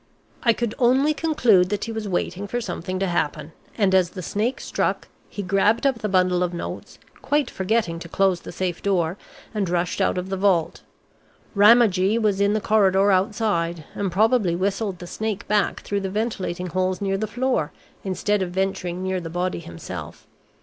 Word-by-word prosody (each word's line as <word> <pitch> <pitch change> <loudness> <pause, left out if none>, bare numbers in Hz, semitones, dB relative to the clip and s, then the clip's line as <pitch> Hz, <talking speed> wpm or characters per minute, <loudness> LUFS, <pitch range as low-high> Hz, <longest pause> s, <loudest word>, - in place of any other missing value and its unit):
"I 235 - +4
could 230 -1 -2
only 265 +5 +4
conclude 245 - +3
that 205 0 -2
he 230 - -4
was 220 -2 -4
waiting 190 +1 -2
for 240 - -2
something 185 -3 -4
to 195 - 0
happen, 155 -3 -2 0.3
and 200 -4 +2
as 185 -2 +4
the 185 0 -8
snake 220 +8 -1
struck, - - -2 0.2
he 205 - -5
grabbed 200 +6 +2
up 265 -4 +2
the 210 - -2
bundle 185 -1 +2
of 175 -1 -1
notes, - - -7 0.2
quite 290 -3 0
forgetting 190 -3 0
to 170 - -9
close 190 -1 +2
the - - -9
safe 180 -2 -3
door, 180 -4 +1 0.4
and 205 -4 -1
rushed 175 0 -1
out - - +1
of 180 +1 -3
the 195 - -2
vault. 185 -4 +1 0.7
Ramagee 210 -1 +5
was 210 -3 +1
in 200 +1 +3
the 215 - +1
corridor 200 -2 +3
outside, 185 -4 0
and 200 -2 -2
probably 210 -2 +2
whistled 195 +1 -1
the 175 - -9
snake 210 +2 -4
back 210 -2 +1
through 200 0 -2
the 190 - -3
ventilating 195 -4 -2
holes 185 +1 -1
near 195 -1 -1
the 215 - -1
floor, 245 - -1 0.3
instead 205 +1 0
of 185 - -1
venturing 185 -1 -2
near 190 0 -1
the 165 - -6
body 180 +2 -2
himself. 155 - -8
195 Hz, 185 wpm, -23 LUFS, 180-215 Hz, 0.7 s, Ramagee